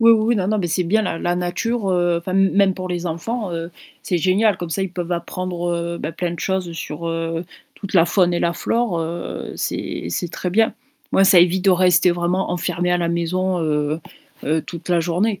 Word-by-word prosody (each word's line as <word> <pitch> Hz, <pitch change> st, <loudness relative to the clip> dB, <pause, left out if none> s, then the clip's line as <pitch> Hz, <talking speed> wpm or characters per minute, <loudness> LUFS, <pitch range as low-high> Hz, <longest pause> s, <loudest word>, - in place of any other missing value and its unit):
Oui, 230 Hz, 0 st, +7 dB
oui, 225 Hz, -1 st, +6 dB
oui. 230 Hz, +2 st, +2 dB
Non, 190 Hz, -2 st, 0 dB
non, 215 Hz, 0 st, +1 dB
mais 180 Hz, -, 0 dB
c'est 175 Hz, +2 st, 0 dB
bien 215 Hz, +6 st, +2 dB
la 165 Hz, -4 st, -2 dB
la 175 Hz, 0 st, 0 dB
nature, 195 Hz, +5 st, -1 dB
heu, 175 Hz, -1 st, +2 dB
enfin, 170 Hz, +2 st, -5 dB
m 195 Hz, 0 st, +4 dB
même 195 Hz, -1 st, +4 dB
pour 185 Hz, -1 st, -5 dB
les 175 Hz, 0 st, -3 dB
enfants, 185 Hz, +5 st, -3 dB
heu, 165 Hz, 0 st, -4 dB, 0.3 s
c'est 175 Hz, -, 0 dB
génial. 195 Hz, +4 st, +3 dB
Comme 175 Hz, -2 st, -6 dB
ça, 190 Hz, -, -1 dB
ils 190 Hz, -2 st, -4 dB
peuvent 175 Hz, -1 st, -3 dB
apprendre, 175 Hz, 0 st, -3 dB
heu, 170 Hz, 0 st, -2 dB
bah, 155 Hz, -, -4 dB
plein 170 Hz, +1 st, -2 dB
de 170 Hz, -, -7 dB
choses 190 Hz, -3 st, -1 dB
sur, 165 Hz, 0 st, -5 dB
heu, 165 Hz, 0 st, -2 dB, 0.3 s
toute 200 Hz, -1 st, -8 dB
la 165 Hz, -3 st, +6 dB
faune 175 Hz, 0 st, +2 dB
et 170 Hz, -, 0 dB
la 170 Hz, -, +1 dB
flore, 230 Hz, -1 st, 0 dB
heu, 170 Hz, +1 st, -5 dB
c'est -, -, -3 dB
c'est 170 Hz, -, -2 dB
très 180 Hz, -, -3 dB
bien. 220 Hz, +4 st, +3 dB, 0.4 s
Ouais, 195 Hz, -, +5 dB
ça 190 Hz, -1 st, +7 dB
évite 180 Hz, +2 st, +4 dB
de -, -, +7 dB
rester 180 Hz, 0 st, +4 dB
vraiment 175 Hz, +2 st, 0 dB
enfermé 180 Hz, 0 st, -1 dB
à 180 Hz, -, +3 dB
la 170 Hz, -1 st, 0 dB
maison, 180 Hz, +2 st, 0 dB
heu 150 Hz, 0 st, 0 dB, 0.4 s
heu, 155 Hz, +2 st, +1 dB
toute 170 Hz, 0 st, -9 dB
la 175 Hz, -1 st, +3 dB
journée. 185 Hz, +5 st, 0 dB
175 Hz, 230 wpm, -21 LUFS, 170-190 Hz, 0.4 s, Oui